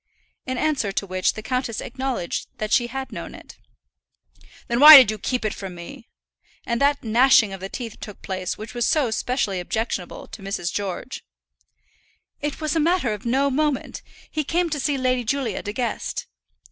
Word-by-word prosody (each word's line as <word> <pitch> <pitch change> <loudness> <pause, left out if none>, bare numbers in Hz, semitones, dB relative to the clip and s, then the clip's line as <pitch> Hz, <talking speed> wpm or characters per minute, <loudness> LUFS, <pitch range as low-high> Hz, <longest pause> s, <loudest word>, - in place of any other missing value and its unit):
In 255 0 -2
answer 290 -8 0
to 200 - -1
which 185 -1 0
the 215 - -8
countess 250 -2 -2
acknowledged 255 -8 -3
that 215 0 -4
she 240 -2 +3
had 265 +2 -6
known - - -7
it. - - -14 1.1
"Then 235 0 0
why 300 +1 +13
did 250 -6 +7
you 215 - -6
keep 250 +2 -2
it 215 - 0
from 190 -3 -7
me?" 230 +9 -10 0.6
And 235 +1 -1
that 285 0 +2
gnashing 230 -2 +4
of 195 - -7
the 190 +1 -6
teeth 230 -1 -7
took 210 - -10
place 185 -2 -3
which 215 +3 -8
was 240 -1 0
so 280 -7 +2
specially 220 -5 -1
objectionable 190 -1 -3
to - - -10
Mrs. 195 -3 -3
George. 200 +5 -4 1.2
"It 295 0 -3
was 310 0 -1
a - - +2
matter 320 -7 +1
of 210 +2 -7
no 275 +3 +2
moment. 295 0 -1 0.3
He 310 - -1
came 340 +3 0
to 295 - -1
see 285 0 0
Lady 255 -1 +1
Julia 245 -3 -2
De 205 - -5
Guest." 240 +2 -3
240 Hz, 185 wpm, -23 LUFS, 205-275 Hz, 1.2 s, why